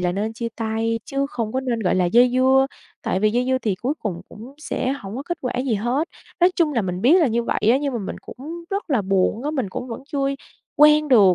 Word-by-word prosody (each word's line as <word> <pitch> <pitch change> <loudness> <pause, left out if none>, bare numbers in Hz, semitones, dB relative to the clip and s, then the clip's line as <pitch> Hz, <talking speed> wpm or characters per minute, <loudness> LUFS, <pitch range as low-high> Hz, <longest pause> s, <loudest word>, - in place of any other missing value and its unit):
là 180 -1 0
nên 210 +4 -2
chia 230 +1 -4
tay 225 0 -1
chứ 275 0 -1
không 225 -3 -3
có 260 - 0
nên, 240 -3 -2
gọi 185 - +1
là, 185 -1 +2
dây 240 +7 +5
dưa, 265 +1 +4 0.4
tại 185 - -1
vì 215 0 +3
dây 245 +2 0
dưa 260 0 +2
thì 215 -6 -1
cuối 255 +9 -2
cùng 180 -5 -4
cũng 240 +6 -12
sẽ 265 -3 -2
hổng 205 -4 -7
có 270 - -4
kết 345 +2 -4
quả 250 - -2
gì 230 - +1
hết. 250 +10 -1 0.3
Nói 355 - +6
chung 320 -4 +2
là 230 -5 +1
mình 180 -1 -3
biết 330 +9 +6
là 315 - +4
như 235 0 0
vậy - - -1
á, 255 - +5
nhưng 280 -2 -2
mà 235 - -2
mình 195 - -5
cũng 330 +6 -9
rất 395 -5 -3
là 240 -7 +2
buồn 195 +4 +1
á, 295 - 0
mình 260 -10 -2
cũng 250 - -5
vẫn 230 +2 -6
chưa 285 - -1 0.6
quen 300 0 +6
được, 200 -8 +6
245 Hz, 265 wpm, -22 LUFS, 215-275 Hz, 0.6 s, Nói